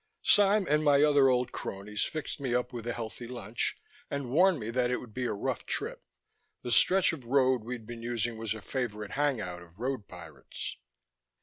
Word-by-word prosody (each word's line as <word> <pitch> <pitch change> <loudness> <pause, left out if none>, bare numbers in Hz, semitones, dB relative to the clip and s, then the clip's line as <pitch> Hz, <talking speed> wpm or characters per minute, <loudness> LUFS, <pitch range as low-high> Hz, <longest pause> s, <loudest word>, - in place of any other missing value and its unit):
Sime 205 0 +5
and 150 +1 +3
my 145 -1 +5
other 145 -3 +5
old 125 -1 +1
cronies 105 +2 -5
fixed 155 -1 -5
me 130 -3 -1
up 125 0 -1
with 120 -1 -6
a 120 - -1
healthy 115 +1 -6
lunch, 120 -3 -3 0.3
and 140 -3 -3
warned 180 +2 +5
me 110 0 -4
that 125 0 +1
it 125 - +1
would 115 -4 -10
be 125 +1 -2
a - - 0
rough 100 - -2
trip; - - -3 0.6
the 120 - -3
stretch 185 +6 +5
of 145 -6 -7
road 130 -1 +3
we'd 120 -1 -6
be 120 +1 -7
using 120 0 -2
was 110 -1 -3
a 110 - -8
favorite 105 -6 -3
hang 145 -3 +1
out 90 -3 -5
of 85 +2 -17
road 130 -3 -2
pirates. 85 -3 -8
125 Hz, 200 wpm, -30 LUFS, 110-140 Hz, 0.6 s, Sime